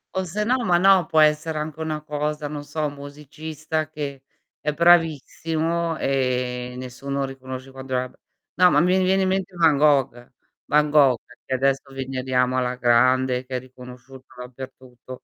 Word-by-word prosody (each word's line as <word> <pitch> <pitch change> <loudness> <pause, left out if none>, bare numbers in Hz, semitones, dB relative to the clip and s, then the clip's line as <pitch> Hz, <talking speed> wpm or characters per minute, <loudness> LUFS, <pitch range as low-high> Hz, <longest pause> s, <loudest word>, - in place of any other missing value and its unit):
O 190 - -1
se 210 +5 -3
no, 255 +3 +2
ma 180 -6 +3
no, 190 -2 +4
può 155 - +3
essere 155 +1 +2
anche 155 0 -5
una 155 -1 -3
cosa, 150 0 -3
non 145 0 -6
so, 155 +1 -3
musicista 150 +2 -6
che 145 -3 -6 0.4
è 150 - -1
bravissimo 165 0 +1
e 125 -2 -1
nessuno 135 +2 -4
riconosce 130 0 -8
quanto 130 0 -8
era 125 0 -1
b - - -24 0.4
no, 180 0 +6
ma - - +3
mi 180 +2 +3
riviene 190 +1 +2
in - - +1
mente 190 -1 -2
Van 165 -3 +4
Gogh. 135 -5 +2 0.3
Van 150 0 +2
Gogh, 140 -5 +5 0.3
che 130 - -2
adesso 135 +1 0
veneriamo 130 -1 -1
alla 125 0 -1
grande, 125 +1 +2
che 130 0 -6
è 125 - -1
riconosciuto 125 +1 -13
dappertutto, 130 0 -11
140 Hz, 160 wpm, -23 LUFS, 130-160 Hz, 0.4 s, no